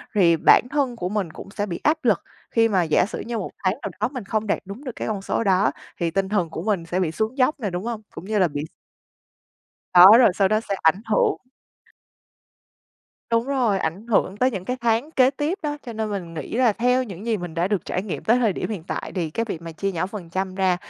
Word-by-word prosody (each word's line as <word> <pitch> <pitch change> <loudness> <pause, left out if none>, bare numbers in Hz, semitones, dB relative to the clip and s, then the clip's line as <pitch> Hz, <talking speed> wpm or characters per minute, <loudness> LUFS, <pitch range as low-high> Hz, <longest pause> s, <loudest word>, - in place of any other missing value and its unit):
thì 170 -5 +5
bản - - +6
thân 275 -4 0
của 180 -5 -3
mình 195 -6 -2
cũng 195 - -10
sẽ 205 -1 -2
bị 175 -4 -5
áp 305 +2 +3
lực 210 -7 +4 0.3
khi 225 -1 +3
mà 190 -4 +2
giả 160 +2 +3
sử 205 - -6
như 235 0 -4
1 200 - -4
tháng 185 0 +2
nào - - -4
đó 215 - +1
mình 255 -5 -6
không 215 +2 -2
đạt - - +1
đúng 200 +8 -9
được 260 - -4
cái - - -4
con 205 -3 -2
số 230 - -1
đó, 190 -1 +3 0.3
thì 170 -2 -1
tinh 195 +2 -1
thần 180 -6 0
của 160 - -5
mình 190 -4 -1
sẽ 175 +2 -2
bị 175 -4 0
xuống 220 - -2
dốc 270 +3 +2
nè, 210 - -2
đúng 180 +1 -4
hông? 230 -2 -4
Cũng - - -9
như 215 +1 0
là 185 - +4
bị 145 -2 -4 1.3
Đó, 185 +5 +10
rồi 240 - +6
sau 195 -2 +3
đó 215 +1 +2
sẽ 205 -3 -3
ảnh 160 +5 +4
hưởng - - +2 1.9
Đúng 230 +2 +2
rồi, 250 -8 +1
ảnh 190 +8 -3
hưởng 200 -3 +1
tới 255 +4 +2
những 195 -6 -5
cái 250 +5 -2
tháng 235 +6 +1
kế 260 -4 +4
tiếp 295 +7 -2
đó, 295 -1 -2
cho 235 - -5
nên 220 -1 -3
mình 175 -5 -5
nghĩ 155 +6 -6
là 245 -2 +4
theo 250 +4 +2
những 200 0 -9
gì 225 - +1
mình 175 -4 -7
đã 175 +3 0
được 205 -5 -1
trải 185 - -2
nghiệm 205 - -5
tới 235 +3 +4
thời 225 -5 +2
điểm 195 - -4
hiện 190 -7 -4
tại - - -5
thì 170 -5 -2
cái 230 +9 -1
việc 175 -7 -6
mà 165 - -7
chia 195 +4 -2
nhỏ 175 +1 -1
phần 190 -4 -8
trăm 185 +1 -2
ra 190 -2 +2
205 Hz, 255 wpm, -23 LUFS, 180-230 Hz, 1.9 s, Đó